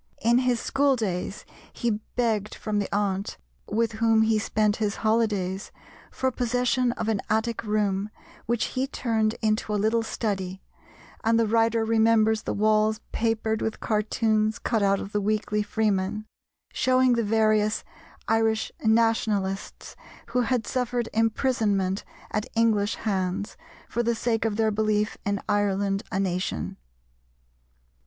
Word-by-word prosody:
In 235 +2 +4
his 250 -2 +1
school 275 +2 +2
days 195 -4 -3 0.3
he 225 -3 -1 0.2
begged 220 -4 0
from 210 -1 -2
the 200 - -3
aunt, 200 -1 -1 0.3
with 225 +1 +1
whom 225 0 +3
he 220 -1 +2
spent 215 -1 +1
his 210 -2 -1
holidays, 205 -4 0 0.4
for 260 0 -1
possession 245 0 +1
of - - -4
an 220 -3 0
attic 220 +2 0
room 210 -2 0 0.4
which 235 0 +1
he 260 +1 0
turned 225 -5 0
into 215 0 +1
a - - +2
little 220 +3 +2
study, 190 -4 -3 0.6
and 225 0 +3
the 230 - +3
writer 225 +1 +2
remembers 220 -1 +3
the - - -3
walls 215 +1 +2
papered 220 -1 0
with 220 - -2
cartoons 215 0 +1
cut 225 -3 0
out 195 0 +3
of 195 - -6
the 210 - 0
Weekly 210 0 0
Freeman, 210 -1 -1 0.5
showing 255 -1 +3
the 235 -1 +1
various 215 0 +2 0.4
Irish 225 -1 +1
Nationalists 220 -3 0 0.3
who 250 +2 +1
had 245 -1 0
suffered 245 -2 -1
imprisonment 215 -4 +1 0.3
at 210 - -2
English 220 -2 +2
hands 195 -1 -2 0.3
for 235 - -1
the 235 0 +1
sake 225 -1 0
of 220 -2 0
their 220 0 +2
belief 210 0 0
in 200 0 0
Ireland 200 -1 +1
a 190 - -1
Nation. 180 - -2
220 Hz, 140 wpm, -26 LUFS, 205-230 Hz, 0.6 s, In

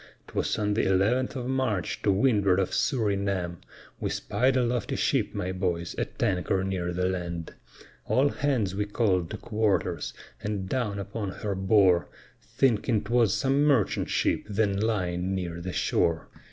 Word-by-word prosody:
'Twas - - -1
on 105 -1 0
the 110 - +2
11th 105 +9 +2
of 125 -2 -3
March, 130 -8 -1
to 100 - +3
windward 100 -3 +3
of 95 - -1
Surinam, 100 -7 0 0.4
We - - -2
spied 130 +1 +1
a 125 - +3
lofty 120 -2 -1
ship, - - 0
my 90 - -2
boys, 90 -2 -2
at - - -4
anchor 95 0 +1
near 90 -2 -2
the 90 +1 -1
land; 85 -3 -4 0.5
All 135 +3 +3
hands 125 -12 0
we 105 +1 -1
call'd 95 -6 +1
to - - -5
quarters, 100 -7 -1 0.3
and 105 -3 -3
down 110 -4 -1
upon 100 +1 -4
her 100 +1 -4
bore, 95 -2 +3 0.3
Thinking 115 -3 +1
'twas 115 -2 +2
some 140 +1 +2
merchant 135 -10 +2
ship - - +1
then 100 -1 +1
lying 95 -4 -1
near 85 -2 -4
the 90 +1 -4
shore. 85 -2 0
100 Hz, 155 wpm, -27 LUFS, 90-115 Hz, 0.5 s, to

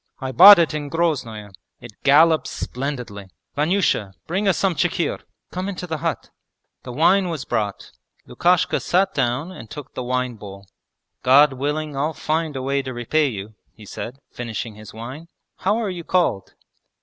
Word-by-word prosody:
I 130 -1 -4
bought 195 +8 +10
it 165 -3 +2
in 145 -1 -4
Groznoe; 130 -11 -2 0.3
it 120 - -11
gallops 155 +3 +4
splendidly! 125 -7 -5 0.3
Vanyusha, 150 - +1
bring 195 +5 -1
us 190 - +3
some 195 -2 +1
chikhir. 170 0 -1 0.3
Come 185 +2 -3
into 185 -2 -5
the 160 -3 -4
hut.' - - -3 0.5
The 125 - -8
wine 175 +7 +3
was 155 -6 -4
brought. 105 -4 -3 0.4
Lukashka 180 0 +2
sat 190 +2 +1
down 135 +5 -1
and 115 -11 -11
took 145 -1 -9
the - - -5
wine 125 -1 -2
bowl. 100 -1 -11 0.6
'God 135 +2 +6
willing 145 +2 -3
I'll 150 +3 -1
find 155 -1 -2
a 130 - -4
way 140 +1 0
to 130 -2 -7
repay 145 +6 +1
you,' 105 -3 -6 0.2
he 110 - -14
said, 120 +5 -7
finishing 115 -1 -5
his 105 0 -12
wine. 130 +9 -9 0.3
'How 210 - +1
are 220 -4 -2
you 175 -2 -6
called?' 170 - 0
145 Hz, 165 wpm, -22 LUFS, 120-170 Hz, 0.6 s, bought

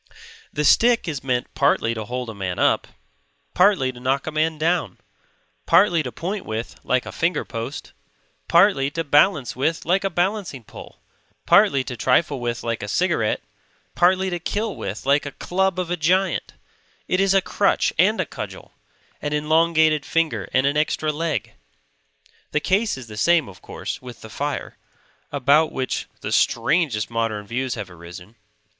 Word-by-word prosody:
The 150 - -1
stick 235 - +4
is 145 -5 -4
meant 125 -2 -2
partly 140 -5 +2
to 110 -1 -5
hold 125 +1 -4
a - - -10
man 95 -3 -4
up, - - +2 0.7
partly 180 -8 +3
to 125 - -13
knock 135 +2 0
a 155 - -3
man 155 +1 0
down; 160 - 0 0.7
partly 170 -1 +5
to 130 -4 -5
point 185 - -4
with 110 +1 -5
like 130 0 0
a - - -7
finger 170 -1 -1
post, 115 +5 -6 0.5
partly 170 -6 +4
to 165 +3 -3
balance 145 - +3
with 160 +6 -1
like 185 +3 +2
a 195 - +1
balancing 175 - -2
pole, - - -13 0.4
partly 135 -1 +5
to 130 -1 -6
trifle 130 +4 +1
with 120 -1 -3
like 115 -1 -2
a 100 - -5
cigarette, 160 - 0 0.5
partly 185 +1 +2
to 175 - -2
kill 210 +5 -2
with 100 +6 -6
like 140 +1 +2
a 145 - -7
club 190 0 -1
of 175 -1 -3
a - - +2
giant; 185 +5 +1 0.5
it 185 - +1
is 195 0 +3
a - - +6
crutch - - +1
and - - +4
a - - +1
cudgel; - - -8 0.5
an 150 0 -3
elongated 155 0 +3
finger 135 - -1
and 130 +1 +2
an 140 +1 +1
extra 155 0 0
leg. 155 0 -3 1.0
The 150 - +3
case 195 +3 +1
is 130 - -9
the 105 -2 -10
same, 170 +4 +3
of 95 - -13
course, - - -6
with 125 -2 -11
the 110 - -11
fire; 145 +4 -4 0.5
about 145 +3 +3
which 130 -1 -3
the - - -4
strangest 145 -11 +1
modern 115 -3 -2
views 125 +3 -2
have 95 - -7
arisen. 90 +5 -12
150 Hz, 170 wpm, -22 LUFS, 125-175 Hz, 1.0 s, a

